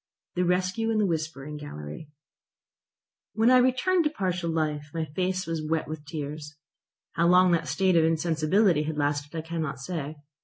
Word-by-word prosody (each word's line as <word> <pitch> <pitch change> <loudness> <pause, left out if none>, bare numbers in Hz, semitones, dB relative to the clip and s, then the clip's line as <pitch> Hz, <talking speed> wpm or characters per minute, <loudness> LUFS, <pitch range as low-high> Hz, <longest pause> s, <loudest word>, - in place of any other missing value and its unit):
THE 180 - 0
RESCUE 185 +5 0
IN 225 - +1
THE 210 - +3
WHISPERING 155 -4 -3
GALLERY 140 - -8 1.3
When 225 +3 +4
I 255 - +7
returned 260 +9 +3
to - - +3
partial 180 - -2
life 150 -2 -1
my 160 -1 -1
face 185 +4 -2
was 165 -1 -3
wet 160 +1 -1
with 155 -1 -7
tears. 150 -1 -6 0.6
How 170 0 +2
long 180 +1 +6
that 165 -3 +1
state 180 +7 +2
of 165 - +5
insensibility 165 +2 +2
had 155 0 -3
lasted 145 +1 -1
I - - -1
cannot 160 -3 -3
say. 155 0 -4
165 Hz, 165 wpm, -27 LUFS, 150-185 Hz, 1.3 s, I